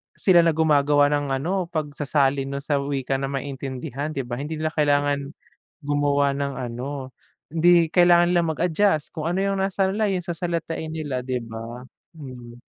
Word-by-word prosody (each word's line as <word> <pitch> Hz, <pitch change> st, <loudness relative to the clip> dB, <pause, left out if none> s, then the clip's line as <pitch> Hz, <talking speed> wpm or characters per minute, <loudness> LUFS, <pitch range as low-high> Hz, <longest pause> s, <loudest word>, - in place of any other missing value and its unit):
Sila 175 Hz, -3 st, +5 dB
na 165 Hz, -, +3 dB
gumagawa 145 Hz, -2 st, +3 dB
ng 145 Hz, -1 st, 0 dB
ano 175 Hz, +7 st, -1 dB
pagsasalin 145 Hz, -2 st, 0 dB
nun 140 Hz, -, -3 dB
sa 145 Hz, 0 st, 0 dB
wika 140 Hz, -1 st, -1 dB
na 135 Hz, -, -2 dB
maintindihan, 135 Hz, +1 st, -4 dB
'di 140 Hz, -, -2 dB
ba? 120 Hz, -1 st, -5 dB
Hindi 155 Hz, +3 st, -5 dB
nila 155 Hz, -, 0 dB
kailangan 145 Hz, -2 st, +1 dB, 0.5 s
gumawa 145 Hz, -1 st, +2 dB
ng 140 Hz, 0 st, -3 dB
ano, 130 Hz, +2 st, -5 dB, 0.4 s
hindi 170 Hz, 0 st, +4 dB
kailangan 175 Hz, -1 st, +5 dB
nila 175 Hz, -, +4 dB
mag-adjust 165 Hz, 0 st, +1 dB
kung 160 Hz, -1 st, -3 dB
ano 175 Hz, -, -1 dB
yung 195 Hz, -1 st, 0 dB
nasa-line 195 Hz, +1 st, 0 dB
yung 180 Hz, -, -4 dB
sasalitain 165 Hz, -2 st, -3 dB
nila, 145 Hz, -5 st, -3 dB
di 125 Hz, 0 st, -3 dB
ba? 115 Hz, +2 st, -8 dB, 0.3 s
Mhm. 125 Hz, -5 st, -10 dB
145 Hz, 155 wpm, -23 LUFS, 135-165 Hz, 0.5 s, Sila